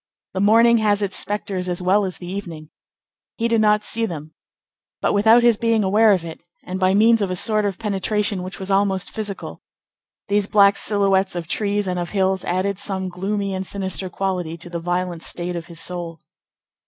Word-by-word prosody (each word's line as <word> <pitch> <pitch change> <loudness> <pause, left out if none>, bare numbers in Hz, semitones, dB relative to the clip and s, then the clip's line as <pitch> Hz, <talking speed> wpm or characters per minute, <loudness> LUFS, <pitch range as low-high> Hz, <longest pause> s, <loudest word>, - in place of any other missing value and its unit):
The 190 - -2
morning 230 +3 +5
has 205 -1 +1
its 195 - -1
spectres 195 -3 -2
as 175 - -2
well 190 +3 +2
as 185 -3 -5
the 175 - -10
evening. 170 -5 -7 0.7
He 230 - 0
did 230 -1 +2
not 210 0 +3
see 230 +1 0
them; 155 -4 -8 0.7
but - - 0
without 220 +4 +5
his 235 -3 +4
being 230 -1 +1
aware 210 +3 +4
of 180 -4 +1
it, 165 - -8 0.2
and 185 +1 -5
by 185 0 +3
means 225 +2 +5
of 200 - 0
a 185 - -2
sort 215 +2 +2
of 195 -3 -2
penetration 210 -1 -1
which 185 +1 -7
was 190 +1 -4
almost 195 -1 +1
physical, 205 -3 -5 0.7
these 205 0 +1
black 200 -1 +5
silhouettes 195 -3 +1
of 170 -2 -4
trees 205 +2 -1
and 180 -1 -1
of 175 - -4
hills 190 -2 0
added 185 +2 -1
some 190 -2 -2
gloomy 195 +2 -3
and 190 0 -3
sinister 190 -1 -2
quality 180 -3 -3
to 175 +1 -10
the 170 - -3
violent 175 0 -2
state 175 +1 -4
of 170 0 -6
his 170 -1 -9
soul. 170 -2 -5
195 Hz, 195 wpm, -21 LUFS, 180-210 Hz, 0.7 s, morning